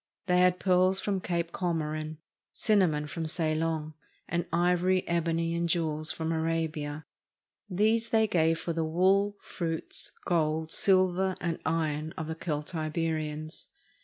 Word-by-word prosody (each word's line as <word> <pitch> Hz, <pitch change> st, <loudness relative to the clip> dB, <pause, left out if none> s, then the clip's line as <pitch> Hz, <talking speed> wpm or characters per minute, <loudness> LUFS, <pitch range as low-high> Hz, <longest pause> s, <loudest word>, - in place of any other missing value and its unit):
They 180 Hz, -2 st, +3 dB
had 180 Hz, 0 st, +4 dB
pearls 185 Hz, 0 st, +3 dB
from 195 Hz, -2 st, -1 dB
Cape 170 Hz, -2 st, -2 dB
Comorin, 155 Hz, -3 st, -2 dB, 0.4 s
cinnamon 180 Hz, -9 st, +2 dB
from 160 Hz, +2 st, -4 dB
Ceylon, 155 Hz, -1 st, -1 dB, 0.3 s
and 170 Hz, 0 st, -1 dB
ivory, 180 Hz, +2 st, +2 dB
ebony, 165 Hz, 0 st, 0 dB
and 170 Hz, 0 st, -1 dB
jewels 155 Hz, -2 st, 0 dB
from 160 Hz, 0 st, -3 dB
Arabia. 160 Hz, -2 st, -2 dB, 0.6 s
These 220 Hz, +4 st, +2 dB
they 220 Hz, -1 st, +4 dB
gave 165 Hz, -5 st, +2 dB
for 170 Hz, -, -3 dB
the 165 Hz, 0 st, 0 dB
wool, 190 Hz, +5 st, +2 dB
fruits, 165 Hz, -3 st, -3 dB
gold, 160 Hz, -2 st, 0 dB
silver, 185 Hz, -1 st, +3 dB
and 170 Hz, -2 st, -2 dB
iron 155 Hz, -1 st, -1 dB
of 160 Hz, -, -3 dB
the 160 Hz, -, -2 dB
Celtiberians. 155 Hz, -1 st, -3 dB
165 Hz, 130 wpm, -29 LUFS, 155-180 Hz, 0.6 s, had